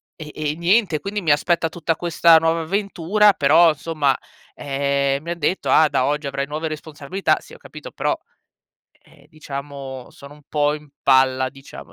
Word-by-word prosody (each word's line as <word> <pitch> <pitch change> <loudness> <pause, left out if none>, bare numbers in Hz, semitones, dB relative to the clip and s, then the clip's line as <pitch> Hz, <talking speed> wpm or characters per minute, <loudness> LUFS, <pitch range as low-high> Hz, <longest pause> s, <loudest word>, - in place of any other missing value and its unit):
e 155 -2 -9
e 150 -1 -2
niente. 170 0 +2
Quindi 200 +6 -4
mi 155 - +2
aspetta 165 +2 +1
tutta 165 0 -2
questa 170 -1 +4
nuova 165 +1 +1
avventura. 200 +3 +2
Però, 155 +2 +5
somma, 145 -3 0 0.4
ehm, 140 0 -1
mi 170 - -5
han 170 - -5
detto: 175 +5 -1
"Ah, 155 -1 +5
da 130 - +1
oggi 150 0 -1
avrai 140 0 -3
nuove 155 +2 -4
responsabilità". 155 +4 -2
Sì, - - -17
ho - - -11
capito, - - -11
però, - - -1 0.9
ehm, 145 -3 -22
diciamo, 140 -4 -8
sono 140 +1 -14
un 150 - -19
po' 150 -1 +1
in 150 0 -11
palla, 130 -1 +3
diciamo. 135 0 -13
150 Hz, 170 wpm, -21 LUFS, 140-165 Hz, 0.9 s, Però